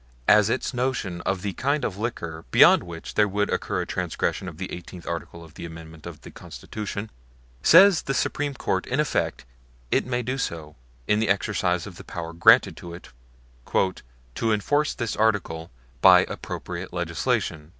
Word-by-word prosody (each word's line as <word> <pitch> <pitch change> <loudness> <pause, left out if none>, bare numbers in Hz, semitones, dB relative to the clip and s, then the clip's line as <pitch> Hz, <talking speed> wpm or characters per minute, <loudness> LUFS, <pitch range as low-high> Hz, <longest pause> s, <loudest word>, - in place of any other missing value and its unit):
as 105 0 +6
its 130 - -1
notion 125 -9 -2
of 95 -1 -1
the 100 -2 -2
kind 140 +7 0
of 95 - -3
liquor 85 -7 -5
beyond - - +7
which 85 -2 -8
there 105 -1 +3
would 105 +1 -1
occur - - -1
a - - -3
transgression 95 - -2
of 80 -3 -8
the 95 +1 -6
Eighteenth 90 0 -9
Article 85 0 -6
of 80 -2 -15
the 85 - -9
Amendments 80 -1 -10
to 85 - -6
the - - -12
Constitution, 105 0 -7 0.5
says 185 - +7
the 135 - -3
Supreme 145 +1 -1
Court 95 -6 -2
in 130 - -1
effect, 150 - -1 0.5
it - - +1
may 125 -1 -1
do 130 +3 -3
so 80 - -4 0.3
in 105 - +3
the 110 -2 0
exercise 95 -3 0
of 95 -4 -10
the - - -10
power 85 -1 -6
granted 85 - +5
to 85 -1 -8
it 90 - -13 0.6
"to - - -2
enforce 145 +8 +1
this 115 -4 -3
Article 100 -7 0 0.3
by - - +8
appropriate - - -6
legislation." 75 -1 -2
95 Hz, 170 wpm, -25 LUFS, 85-115 Hz, 0.6 s, by